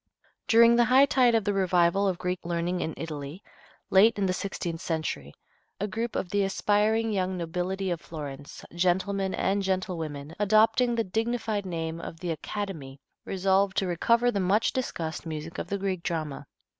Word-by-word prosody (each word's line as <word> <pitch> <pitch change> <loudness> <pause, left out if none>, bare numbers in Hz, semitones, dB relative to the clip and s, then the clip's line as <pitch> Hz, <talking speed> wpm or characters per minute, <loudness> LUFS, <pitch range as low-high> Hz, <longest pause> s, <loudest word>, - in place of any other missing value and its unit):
During 235 +1 +6
the 240 0 +5
high 260 +3 +6
tide 255 -4 +3
of 225 - +2
the 205 0 0
revival 185 0 +2
of 185 -2 0
Greek 180 0 -2
learning 175 +1 -1
in 160 - -3
Italy, 155 +2 -6 0.5
late 210 +4 +6
in 200 - +1
the 185 - +1
sixteenth 175 -4 -4
century, 155 - -3 0.5
a 205 - -1
group 225 +3 -3
of 180 - -2
the 205 0 +2
aspiring 210 +3 +1
young 185 -1 -1
nobility 180 +3 -2
of 170 -1 -3
Florence, 145 -4 -8
gentlemen 190 +2 0
and 200 +1 0
gentlewomen, 165 -6 -3
adopting 225 +4 +3
the 230 - +1
dignified 220 -1 -2
name 165 -1 -4
of 165 - -8
the 175 -1 -3
"Academy," 160 -6 -5 0.3
resolved 190 0 +1
to 195 - +2
recover 235 +7 +2
the 200 - -1
much 195 +4 +2
discussed 170 -11 -3
music 155 +1 -6
of - - -4
the 200 - -2
Greek 190 -2 -2
drama. 155 -5 -4
190 Hz, 170 wpm, -27 LUFS, 170-210 Hz, 0.5 s, During